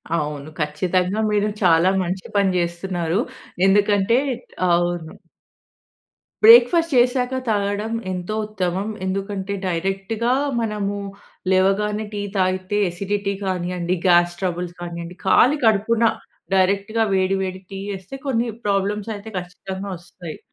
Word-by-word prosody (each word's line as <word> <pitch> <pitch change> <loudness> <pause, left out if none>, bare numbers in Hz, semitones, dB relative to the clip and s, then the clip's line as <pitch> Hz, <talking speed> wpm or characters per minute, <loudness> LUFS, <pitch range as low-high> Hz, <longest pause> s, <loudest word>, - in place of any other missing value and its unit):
అవును. 150 -1 -3
ఖచ్చితంగా 180 +6 0
మీరు 210 0 +2 0.2
చాలా 170 +1 +5
మంచి 185 +2 -4
పని 200 -1 +4
చేస్తున్నారు. 170 +1 -1 0.5
ఎందుకంటే 205 +3 +3 0.5
అవును. 175 -1 0 1.3
బ్రేక్‌ఫాస్ట్ 245 +9 +7
చేశాక, 250 +1 +3 0.2
తాగడం 205 +1 0 0.2
ఎంతో 180 +3 -4
ఉత్తమం. 190 -1 -2 0.2
ఎందుకంటే, 195 +1 -3
డైరెక్ట్‌గా 195 +7 -1 0.3
మనము 210 -2 -2 0.5
లేవగానే, 205 +3 +2
టీ 205 - -3 0.2
తాగితే 185 +2 0
ఎసిడిటీ 200 +3 -2
కానియండి, 180 -1 -1
గ్యాస్ 175 -1 +4
ట్రబుల్స్ 175 -1 -2
కానియండి, 170 0 -6
కాలి 255 +9 +5
కడుపున 220 +2 +3 0.5
డైరెక్ట్‌గా 200 +4 +2
వేడి, 190 0 +2
వేడి 185 0 -5
టీ 195 - -5 0.2
ఏస్తే 190 +8 -9
కొన్ని 235 -2 +1 0.2
ప్రాబ్లమ్స్ 205 +2 0
అయితే 210 +2 -9
ఖచ్చితంగా 190 +2 -7
వోస్తాయి. 175 -1 -10
195 Hz, 110 wpm, -22 LUFS, 180-210 Hz, 1.3 s, బ్రేక్‌ఫాస్ట్